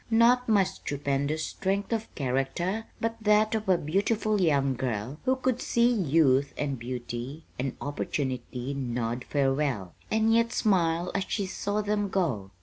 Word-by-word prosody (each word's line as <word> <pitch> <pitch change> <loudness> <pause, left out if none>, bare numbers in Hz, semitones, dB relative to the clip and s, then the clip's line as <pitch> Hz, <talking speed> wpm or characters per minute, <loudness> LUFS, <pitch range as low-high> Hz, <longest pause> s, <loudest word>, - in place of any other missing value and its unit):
Not 235 +2 +4
my 205 -3 +5
stupendous 145 -4 -2
strength 200 +3 -2
of 225 -1 -2
character, 145 - -1
but 230 0 -1
that 215 +1 +4
of 215 -3 -2
a 185 - +5
beautiful 205 +6 0
young 140 -5 +3
girl 125 +2 -3
who 260 - +3
could 260 -1 -1
see 235 +1 +3
youth 145 - +3
and 140 -3 -2
beauty 120 +4 -5 0.2
and 130 0 -2
opportunity 130 -2 -3
nod 120 -2 -2
farewell, 135 - 0 0.2
and 220 +1 +3
yet 230 0 +3
smile 175 -5 +2
as 195 -1 0
she 200 - -1
saw 205 +2 -2
them 205 -1 0
go. 135 - -1
165 Hz, 145 wpm, -28 LUFS, 135-210 Hz, 0.2 s, my